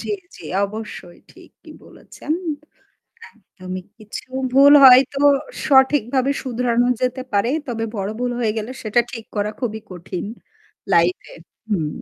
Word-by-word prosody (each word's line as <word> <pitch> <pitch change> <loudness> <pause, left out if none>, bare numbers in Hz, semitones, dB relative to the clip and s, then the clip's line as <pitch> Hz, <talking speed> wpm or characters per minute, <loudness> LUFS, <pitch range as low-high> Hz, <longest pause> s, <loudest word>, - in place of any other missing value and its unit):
জ্বী, - - -6 0.2
জ্বী, - - -11 0.2
অবশ্যই 210 -4 -9
ঠিকই - - -17
বলেছেন। 305 - -7 1.0
একদমই 185 -4 -9 0.2
কিছু 215 +3 -9 0.2
ভুল 280 +2 +7
হয়তো 265 +1 +7 0.5
সঠিকভাবে 265 -1 +3
শুধরানো 245 -1 0
যেতে 255 +1 -1
পারে। 205 +3 +2 0.2
তবে 230 -2 -3
বড় 195 -1 -3
ভুল 245 0 -1
হয়ে 225 -3 +1
গেলে 220 +3 -4
সেটা 220 +2 +1
ঠিক 230 -4 -8
করা 210 0 -1
খুবই 220 -4 -3
কঠিন। 180 +1 -6 0.7
লাইফ 170 +1 +3
এ - - -12 0.3
হুম। 185 -8 -1
225 Hz, 130 wpm, -20 LUFS, 205-255 Hz, 1.0 s, ভুল